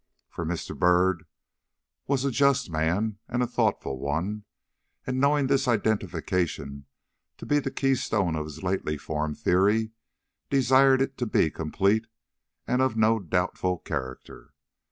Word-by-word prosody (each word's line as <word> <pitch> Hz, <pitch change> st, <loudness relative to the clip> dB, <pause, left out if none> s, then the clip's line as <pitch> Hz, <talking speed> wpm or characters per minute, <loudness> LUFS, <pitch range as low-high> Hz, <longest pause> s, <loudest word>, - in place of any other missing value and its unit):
For 85 Hz, -, -5 dB
Mr. 85 Hz, 0 st, -4 dB
Byrd 90 Hz, -1 st, +2 dB, 0.8 s
was 135 Hz, -1 st, 0 dB
a 140 Hz, -, +1 dB
just 140 Hz, -4 st, +2 dB
man 90 Hz, +7 st, 0 dB
and 120 Hz, +1 st, 0 dB
a -, -, +2 dB
thoughtful 65 Hz, -, -1 dB
one, 85 Hz, +10 st, -3 dB, 0.6 s
and 130 Hz, 0 st, -2 dB
knowing 140 Hz, +1 st, +3 dB
this 135 Hz, 0 st, +1 dB
identification 90 Hz, -, -1 dB, 0.5 s
to -, -, -9 dB
be 145 Hz, -, +2 dB
the 135 Hz, -, -3 dB
key 135 Hz, 0 st, +1 dB
stone 100 Hz, -9 st, 0 dB
of 75 Hz, -1 st, -3 dB
his 75 Hz, +2 st, -10 dB
lately 90 Hz, -5 st, -1 dB
formed 75 Hz, 0 st, -3 dB
theory, 105 Hz, +5 st, +2 dB, 0.6 s
desired 135 Hz, 0 st, +4 dB
it 135 Hz, 0 st, -6 dB
to 120 Hz, -, -1 dB
be 80 Hz, -6 st, +2 dB
complete 100 Hz, +7 st, 0 dB, 0.6 s
and 125 Hz, +1 st, +1 dB
of 130 Hz, -4 st, +1 dB
no 110 Hz, +1 st, +3 dB
doubtful 90 Hz, 0 st, -1 dB
character. 65 Hz, -5 st, -7 dB
100 Hz, 140 wpm, -26 LUFS, 80-130 Hz, 0.8 s, desired